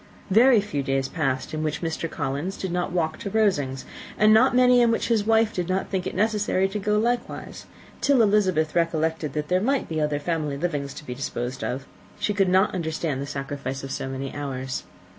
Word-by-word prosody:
Very 230 Hz, +2 st, +6 dB
few 150 Hz, -9 st, -3 dB
days 135 Hz, 0 st, 0 dB
passed 135 Hz, -6 st, -2 dB
in 155 Hz, -, -2 dB
which 155 Hz, +2 st, -2 dB
Mr. 165 Hz, 0 st, -2 dB
Collins 145 Hz, +8 st, -3 dB
did 190 Hz, -, -4 dB
not 180 Hz, 0 st, -1 dB
walk 160 Hz, -3 st, -1 dB
to 200 Hz, -, -4 dB
Rosings, 145 Hz, -12 st, +1 dB, 0.3 s
and 215 Hz, 0 st, +6 dB
not 245 Hz, +3 st, +5 dB
many 250 Hz, -1 st, +6 dB
in 235 Hz, -, +4 dB
which 230 Hz, -, 0 dB
his 220 Hz, -3 st, +2 dB
wife 225 Hz, 0 st, +3 dB
did 180 Hz, -1 st, -3 dB
not 190 Hz, +1 st, -1 dB
think 185 Hz, -2 st, -1 dB
it -, -, -5 dB
necessary 210 Hz, -2 st, +1 dB
to 210 Hz, +2 st, -3 dB
go 210 Hz, +1 st, +1 dB
likewise; 240 Hz, +2 st, -2 dB, 0.3 s
and -, -, -24 dB
till 275 Hz, -5 st, +4 dB
Elizabeth 190 Hz, -7 st, +2 dB
recollected 160 Hz, -3 st, 0 dB
that 150 Hz, -1 st, -2 dB
there 180 Hz, +2 st, +2 dB
might 270 Hz, +5 st, +1 dB
be 160 Hz, -1 st, -2 dB
other 150 Hz, -1 st, 0 dB
family 150 Hz, -2 st, -2 dB
livings 145 Hz, -3 st, -3 dB
to 150 Hz, -, -9 dB
be 125 Hz, -, -5 dB
disposed 125 Hz, -1 st, -4 dB
of, 135 Hz, +2 st, -3 dB, 0.3 s
she 210 Hz, -, 0 dB
could 195 Hz, -2 st, +2 dB
not 190 Hz, +3 st, +3 dB
understand 160 Hz, -5 st, -2 dB
the 140 Hz, -, -4 dB
sacrifice 135 Hz, -1 st, -5 dB
of 135 Hz, -, -6 dB
so -, -, -3 dB
many 135 Hz, 0 st, -5 dB
hours. 130 Hz, -3 st, -4 dB
165 Hz, 210 wpm, -25 LUFS, 140-210 Hz, 0.3 s, Very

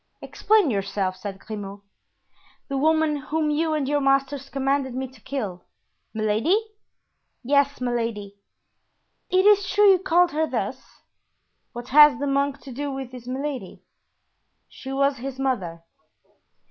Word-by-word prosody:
"Explain 420 Hz, -9 st, +2 dB
yourself." 195 Hz, -2 st, -2 dB
said 195 Hz, +1 st, -7 dB
Grimaud. 200 Hz, -1 st, -8 dB, 0.9 s
"The 275 Hz, -, -2 dB
woman 315 Hz, 0 st, +2 dB
whom 300 Hz, +2 st, -1 dB
you 310 Hz, +1 st, 0 dB
and 290 Hz, -3 st, -1 dB
your 290 Hz, +1 st, +1 dB
masters 275 Hz, 0 st, 0 dB
commanded 270 Hz, -1 st, -1 dB
me 265 Hz, 0 st, -3 dB
to 255 Hz, -3 st, -19 dB
kill——" 210 Hz, -11 st, -5 dB, 0.5 s
"Milady?" 220 Hz, -, +1 dB, 0.9 s
"Yes, 280 Hz, +2 st, +2 dB
Milady; 230 Hz, -5 st, -3 dB, 1.0 s
it 370 Hz, +1 st, +3 dB
is 410 Hz, -2 st, +5 dB
true 410 Hz, -1 st, +5 dB
you 375 Hz, -, +4 dB
called 355 Hz, -1 st, +3 dB
her 315 Hz, +2 st, 0 dB
thus." -, -, -5 dB, 0.7 s
"What 240 Hz, 0 st, -8 dB
has 295 Hz, 0 st, +7 dB
the 285 Hz, -, -3 dB
monk 280 Hz, 0 st, 0 dB
to 275 Hz, -, -10 dB
do 285 Hz, +4 st, -4 dB
with 265 Hz, -2 st, -6 dB
this 250 Hz, -1 st, -11 dB
Milady?" 260 Hz, -5 st, -5 dB, 0.8 s
"She 265 Hz, -, -9 dB
was 275 Hz, 0 st, +1 dB
his 265 Hz, +1 st, -6 dB
mother." 190 Hz, -12 st, -2 dB
275 Hz, 135 wpm, -24 LUFS, 235-295 Hz, 1.0 s, has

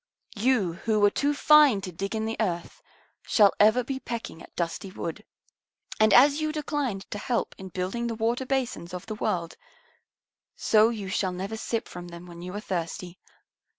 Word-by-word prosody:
You 215 Hz, -5 st, +2 dB, 0.2 s
who 215 Hz, -1 st, +3 dB
were 205 Hz, 0 st, +5 dB
too 290 Hz, 0 st, 0 dB
fine 295 Hz, -7 st, +6 dB
to 190 Hz, -2 st, -6 dB
dig 195 Hz, +5 st, -4 dB
in 220 Hz, 0 st, -1 dB
the 225 Hz, 0 st, -2 dB
earth 180 Hz, -, -2 dB, 0.4 s
shall 205 Hz, -3 st, +4 dB
ever 220 Hz, +4 st, +5 dB
be 265 Hz, +2 st, -4 dB
pecking 230 Hz, -10 st, -6 dB
at -, -, -15 dB
dusty 170 Hz, +3 st, -3 dB
wood. 185 Hz, +2 st, -6 dB, 0.8 s
And 215 Hz, -1 st, +5 dB
as 280 Hz, +7 st, +6 dB
you 310 Hz, 0 st, 0 dB
declined 290 Hz, -9 st, -2 dB
to 205 Hz, -, -4 dB
help 240 Hz, +2 st, -1 dB
in 190 Hz, 0 st, -8 dB
building 190 Hz, +7 st, -3 dB
the 230 Hz, -, -3 dB
water 235 Hz, +4 st, -1 dB
basins 245 Hz, -10 st, -2 dB
of 180 Hz, -, -7 dB
the 220 Hz, -, -5 dB
world, 170 Hz, -5 st, -2 dB, 1.0 s
so 220 Hz, +1 st, +4 dB
you 215 Hz, -4 st, -4 dB
shall 190 Hz, 0 st, 0 dB
never 190 Hz, +4 st, -4 dB
sip 225 Hz, +1 st, -3 dB
from 175 Hz, 0 st, -8 dB
them 170 Hz, 0 st, -10 dB
when 170 Hz, -1 st, -11 dB
you 180 Hz, +1 st, -6 dB
are -, -, -2 dB
thirsty. 175 Hz, -1 st, -4 dB
215 Hz, 185 wpm, -27 LUFS, 180-240 Hz, 1.0 s, fine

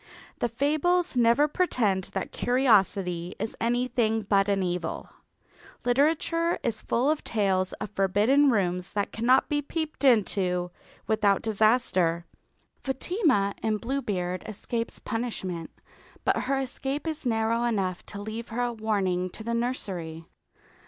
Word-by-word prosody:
The 240 Hz, -, 0 dB
fables 310 Hz, +8 st, +1 dB
never 240 Hz, +4 st, +4 dB
pretend 220 Hz, -, +1 dB
that 190 Hz, -, -3 dB
curiosity 195 Hz, -8 st, +2 dB
is 220 Hz, -, -4 dB
anything 235 Hz, -2 st, +1 dB
but 200 Hz, 0 st, +2 dB
an 195 Hz, -1 st, +1 dB
evil. 175 Hz, -2 st, -3 dB, 0.7 s
Literature 320 Hz, +6 st, +2 dB
is 230 Hz, -3 st, -2 dB
full 255 Hz, +6 st, +1 dB
of 310 Hz, -, -2 dB
tales 190 Hz, -4 st, +1 dB
of 210 Hz, -, -6 dB
forbidden 210 Hz, +9 st, +3 dB
rooms 180 Hz, -5 st, 0 dB
that 205 Hz, -1 st, -1 dB
cannot 245 Hz, +4 st, +3 dB
be 290 Hz, 0 st, 0 dB
peeped 310 Hz, +1 st, -4 dB
into 190 Hz, -7 st, +2 dB, 0.3 s
without 210 Hz, -3 st, +2 dB
disaster. 210 Hz, -6 st, +2 dB, 0.6 s
Fatima 265 Hz, -, +1 dB
in 215 Hz, -1 st, 0 dB
Bluebeard 205 Hz, -8 st, -2 dB
escapes 230 Hz, +2 st, -4 dB
punishment, 190 Hz, -8 st, -4 dB, 0.6 s
but -, -, +3 dB
her 270 Hz, +1 st, 0 dB
escape 270 Hz, +2 st, -3 dB
is 315 Hz, -1 st, -2 dB
narrow 225 Hz, 0 st, +1 dB
enough 195 Hz, -6 st, -1 dB
to 200 Hz, -, -6 dB
leave 220 Hz, +3 st, -6 dB
her 240 Hz, +2 st, -1 dB
a 240 Hz, 0 st, -1 dB
warning 195 Hz, -5 st, 0 dB
to 220 Hz, -, -9 dB
the 235 Hz, +1 st, -2 dB
nursery. 185 Hz, -10 st, -3 dB
225 Hz, 130 wpm, -27 LUFS, 195-255 Hz, 0.7 s, never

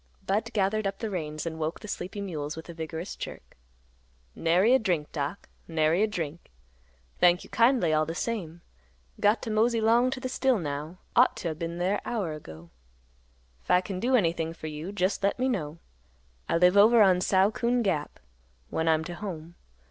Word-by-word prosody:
Budd 210 Hz, +4 st, -1 dB
gathered 210 Hz, +1 st, +1 dB
up 195 Hz, -, -4 dB
the 220 Hz, -2 st, -4 dB
reins 155 Hz, -4 st, -4 dB
and 160 Hz, -1 st, -4 dB
woke 160 Hz, +2 st, -2 dB
the 210 Hz, -, -10 dB
sleepy 200 Hz, 0 st, -5 dB
mules 155 Hz, -6 st, -4 dB
with 160 Hz, -, -9 dB
a -, -, -6 dB
vigorous 160 Hz, +2 st, -6 dB
jerk. -, -, -9 dB, 0.8 s
"Nary 180 Hz, +8 st, +3 dB
a 265 Hz, -, +5 dB
drink, 175 Hz, -9 st, -1 dB
Doc; 145 Hz, +5 st, -4 dB, 0.2 s
nary 160 Hz, +2 st, +2 dB
a 215 Hz, -, +4 dB
drink. 170 Hz, -6 st, -5 dB, 0.7 s
Thank 180 Hz, 0 st, +4 dB
you -, -, -15 dB
kindly 230 Hz, -8 st, +3 dB
all 155 Hz, 0 st, +2 dB
the 165 Hz, -, -4 dB
same. 175 Hz, -7 st, -4 dB, 0.6 s
Got 210 Hz, +3 st, +3 dB
t' 225 Hz, -, -3 dB
mosey 230 Hz, +2 st, +2 dB
'long 230 Hz, +3 st, +4 dB
t' 260 Hz, -, -4 dB
th' 255 Hz, -, -3 dB
still 265 Hz, -2 st, +2 dB
now; 150 Hz, 0 st, -5 dB, 0.2 s
ought 250 Hz, +1 st, +5 dB
t' 170 Hz, -, -3 dB
o' -, -, -2 dB
been 165 Hz, +2 st, -5 dB
there 185 Hz, +4 st, 0 dB
hour 205 Hz, -10 st, -2 dB
ago. 85 Hz, -, -11 dB, 0.9 s
'f -, -, -27 dB
I 180 Hz, -, +5 dB
can 185 Hz, 0 st, -5 dB
do 255 Hz, +5 st, +2 dB
anything 165 Hz, -6 st, +1 dB
fer 165 Hz, -, -10 dB
you, 155 Hz, +4 st, -5 dB
jest 200 Hz, 0 st, 0 dB
le' 200 Hz, -, +3 dB
me 255 Hz, +1 st, +1 dB
know. 165 Hz, -, -2 dB, 0.7 s
I -, -, +2 dB
live 180 Hz, +2 st, +5 dB
over 220 Hz, +2 st, +7 dB
on 185 Hz, -2 st, +4 dB
Sow 190 Hz, +2 st, +3 dB
Coon 240 Hz, +1 st, 0 dB
Gap, 155 Hz, -8 st, -2 dB, 0.5 s
when 160 Hz, -, -1 dB
I'm 160 Hz, -1 st, +3 dB
't 175 Hz, -, -6 dB
home. 175 Hz, -4 st, -7 dB
180 Hz, 195 wpm, -27 LUFS, 160-215 Hz, 0.9 s, over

